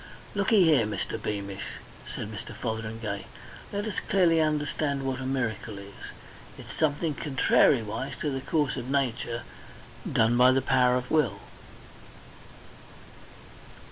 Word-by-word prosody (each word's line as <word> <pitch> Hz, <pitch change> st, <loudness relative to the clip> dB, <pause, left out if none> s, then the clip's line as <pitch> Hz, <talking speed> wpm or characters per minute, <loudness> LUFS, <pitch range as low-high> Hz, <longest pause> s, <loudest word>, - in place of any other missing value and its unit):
"Looky 200 Hz, 0 st, +4 dB
here, 150 Hz, -10 st, +4 dB
Mr. 105 Hz, -, -3 dB
Beamish," 100 Hz, -2 st, -4 dB, 0.4 s
said -, -, -4 dB
Mr. -, -, -7 dB
Fotheringay. 110 Hz, -2 st, -4 dB, 0.4 s
"Let 205 Hz, +1 st, -2 dB
us 215 Hz, -, -2 dB
clearly 170 Hz, -4 st, +4 dB
understand 145 Hz, -2 st, 0 dB
what 135 Hz, -1 st, -2 dB
a 130 Hz, -, -4 dB
miracle 115 Hz, -5 st, -2 dB
is. 100 Hz, 0 st, -10 dB, 0.6 s
It's -, -, -10 dB
something 155 Hz, +1 st, +1 dB
contrariwise 135 Hz, -4 st, +2 dB
to 150 Hz, -, 0 dB
the 135 Hz, -1 st, -3 dB
course 145 Hz, 0 st, 0 dB
of 125 Hz, 0 st, -5 dB
nature 120 Hz, -4 st, -1 dB, 0.7 s
done 115 Hz, +1 st, +3 dB
by 130 Hz, +1 st, +6 dB
power 125 Hz, -1 st, +3 dB
of 125 Hz, 0 st, -3 dB
Will..." 130 Hz, -11 st, +2 dB
130 Hz, 120 wpm, -28 LUFS, 115-150 Hz, 0.7 s, by